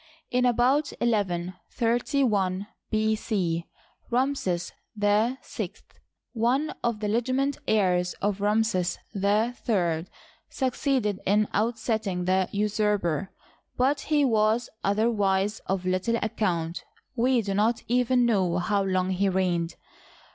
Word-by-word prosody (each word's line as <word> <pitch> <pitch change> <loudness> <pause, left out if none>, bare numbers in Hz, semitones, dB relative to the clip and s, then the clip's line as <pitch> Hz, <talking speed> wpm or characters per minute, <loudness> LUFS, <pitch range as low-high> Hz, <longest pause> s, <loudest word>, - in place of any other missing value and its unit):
In 250 0 +2
about 250 +5 +2
1131 205 - 0 0.2
B. 220 0 +1
C 175 -7 -1 0.4
Ramses 240 -9 0 0.2
VI, 210 +4 +2 1.0
one 250 +6 +1
of 235 -2 -1
the 210 - -1
legitimate 255 +5 0
heirs 180 -4 +2
of 205 0 -2
Ramses 205 -4 +1 0.2
III, 200 -4 0 0.4
succeeded 255 -6 0
in 210 +2 +3
ousting 220 -4 -1
the 185 0 +2
usurper; 205 -4 0 0.5
but 275 +3 +2
he 295 -2 +2
was 220 0 +2
otherwise 205 -1 +1
of 190 -1 -1
little 185 +6 +1
account— 180 -7 -1 0.3
we 245 0 +2
do 200 -1 -2
not 220 +4 +1
even 245 +1 +3
know 190 -7 +2
how 200 +3 +1
long 185 -1 0
he 195 +1 +1
reigned. 180 -3 0
210 Hz, 105 wpm, -26 LUFS, 185-235 Hz, 1.0 s, in